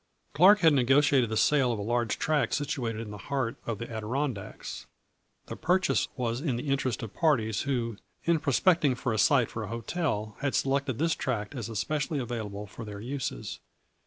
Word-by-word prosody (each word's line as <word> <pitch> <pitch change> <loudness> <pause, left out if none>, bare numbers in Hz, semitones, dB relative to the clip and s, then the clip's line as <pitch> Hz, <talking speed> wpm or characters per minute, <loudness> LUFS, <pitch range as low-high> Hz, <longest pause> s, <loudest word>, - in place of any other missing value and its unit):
" - - -41
Clark 190 +7 +7
had 160 -3 +6
negotiated 135 -1 +4
the 110 - -1
sale 135 -2 +3
of 115 - -2
a - - -4
large 120 0 0
tract 150 -6 +1
situated 120 -6 -2
in 110 -2 -7
the 105 - -8
heart 135 -5 -1
of 115 -2 -2
the 115 - -6
Adirondacks. 115 0 -4 0.6
The - - -6
purchase 185 +2 +2
was 120 0 -1
in 140 -6 0
the 125 +4 -4
interest 130 -3 0
of 110 - -7
parties 115 - +1
who, 115 -5 -1 0.3
in 170 -1 +2
prospecting 150 0 +3
for 125 -1 -2
a 110 - -1
site 130 -3 +4
for 115 - -4
a 110 - -4
hotel, 115 - -2
had 140 -1 -1
selected 135 -2 0
this 165 +1 +2
tract 110 -4 -3
as 120 -5 -5
especially 145 +7 -1
available 110 -5 -4
for 105 +3 -9
their 105 -2 -7
uses. 125 - -4
125 Hz, 190 wpm, -28 LUFS, 110-145 Hz, 0.6 s, Clark